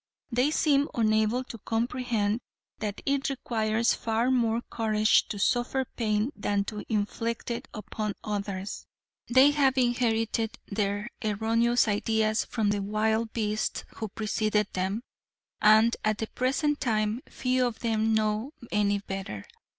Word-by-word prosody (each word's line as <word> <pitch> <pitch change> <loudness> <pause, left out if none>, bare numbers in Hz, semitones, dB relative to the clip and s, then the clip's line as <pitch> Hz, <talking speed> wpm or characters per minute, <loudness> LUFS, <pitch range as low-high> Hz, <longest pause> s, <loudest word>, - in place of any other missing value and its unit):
They 250 +4 +2
seem 290 -2 +3
unable 220 +2 +2
to 230 -2 -9
comprehend 225 -1 -1 0.4
that 210 -2 -4
it 275 -1 +1
requires 230 -3 0
far 230 +3 0
more 235 -2 +1
courage 215 -1 +2
to 205 - -5
suffer 245 +5 +1
pain 215 +1 -1
than 205 -1 0
to 210 +1 -6
inflict 230 +3 -2
it 235 - -4
upon 215 -1 -4
others. 200 -2 -4 0.4
They 260 +4 +7
have 275 -2 +2
inherited 230 -2 +1
their 205 +1 -2 0.2
erroneous 225 +3 +2
ideas 215 +1 +1
from 215 -3 0
the 205 -1 -1
wild 220 +2 0
beasts 215 -1 -1
who 220 - -3
preceded 215 0 -1
them, 190 +5 -1 0.6
and 220 +2 +6
at 215 -1 +1
the 220 - -2
present 290 +3 0
time 215 -1 0
few 255 0 +1
of 235 - -6
them 220 -1 +1
know 215 +5 0 0.2
any 205 -1 +2
better. 190 - -6
220 Hz, 135 wpm, -28 LUFS, 210-240 Hz, 0.6 s, They